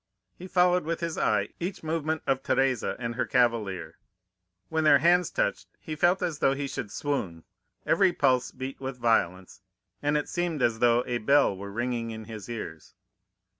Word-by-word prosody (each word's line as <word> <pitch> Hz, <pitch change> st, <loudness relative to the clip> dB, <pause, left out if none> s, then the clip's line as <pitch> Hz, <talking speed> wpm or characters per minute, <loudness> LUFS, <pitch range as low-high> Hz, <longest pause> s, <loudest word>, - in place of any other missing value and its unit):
He 185 Hz, -, -10 dB
followed 180 Hz, -1 st, +3 dB
with 165 Hz, +2 st, -2 dB
his 165 Hz, -1 st, -3 dB
eye -, -, +1 dB
each 180 Hz, +1 st, -4 dB
movement 160 Hz, -1 st, -2 dB
of 135 Hz, -1 st, +1 dB
Teresa 135 Hz, -3 st, +1 dB
and 120 Hz, -1 st, -4 dB
her 125 Hz, +1 st, -1 dB
cavalier; 115 Hz, -7 st, 0 dB, 0.7 s
when 160 Hz, -1 st, -1 dB
their 155 Hz, -, +7 dB
hands 175 Hz, +2 st, +3 dB
touched, -, -, -1 dB
he 155 Hz, -4 st, -6 dB
felt 175 Hz, +4 st, +2 dB
as 160 Hz, -4 st, -2 dB
though 135 Hz, -, +3 dB
he 140 Hz, 0 st, -3 dB
should 115 Hz, -5 st, -5 dB
swoon; 100 Hz, -, -3 dB, 0.4 s
every -, -, +4 dB
pulse 125 Hz, -1 st, +2 dB
beat 130 Hz, +1 st, -7 dB
with 135 Hz, -1 st, -5 dB
violence, 95 Hz, -7 st, 0 dB, 0.4 s
and 145 Hz, +1 st, +1 dB
it 150 Hz, -, -2 dB
seemed 175 Hz, -5 st, -2 dB
as 115 Hz, -1 st, +1 dB
though 120 Hz, 0 st, +4 dB
a 120 Hz, -1 st, -2 dB
bell 140 Hz, -3 st, +3 dB
were 100 Hz, +1 st, -8 dB
ringing 120 Hz, +1 st, -2 dB
in 110 Hz, -1 st, -7 dB
his 110 Hz, -1 st, -9 dB
ears. 95 Hz, -9 st, -7 dB
130 Hz, 175 wpm, -27 LUFS, 115-160 Hz, 0.7 s, their